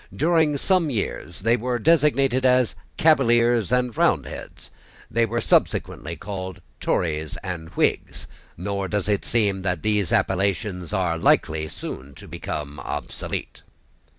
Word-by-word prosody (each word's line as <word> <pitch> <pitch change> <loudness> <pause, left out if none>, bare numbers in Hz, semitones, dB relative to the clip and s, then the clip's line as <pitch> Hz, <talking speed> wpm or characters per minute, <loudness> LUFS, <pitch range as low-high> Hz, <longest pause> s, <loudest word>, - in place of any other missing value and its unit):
During 160 -1 +3
some 180 +1 +2
years 100 - -4
they 115 +4 +3
were 125 +1 -1
designated 140 -2 +3
as 125 -2 +4 0.2
Cavaliers 120 - +4
and 125 -2 +1
Roundheads. - - -1 0.4
They 115 0 +2
were 120 +2 -1
subsequently 85 -6 +1
called 95 -1 -6 0.2
Tories 80 -3 -1
and 85 -4 -5
Whigs; - - 0 0.3
nor 100 +2 -2
does 100 0 -2
it 105 -2 +1
seem 105 -5 +1
that 90 -4 -2
these 105 -4 +1
appellations 95 -1 0
are 90 -5 0
likely 80 -1 +2
soon 70 -2 -8
to - - -12
become 75 -1 -5
obsolete. - - -5
105 Hz, 125 wpm, -24 LUFS, 90-125 Hz, 0.4 s, as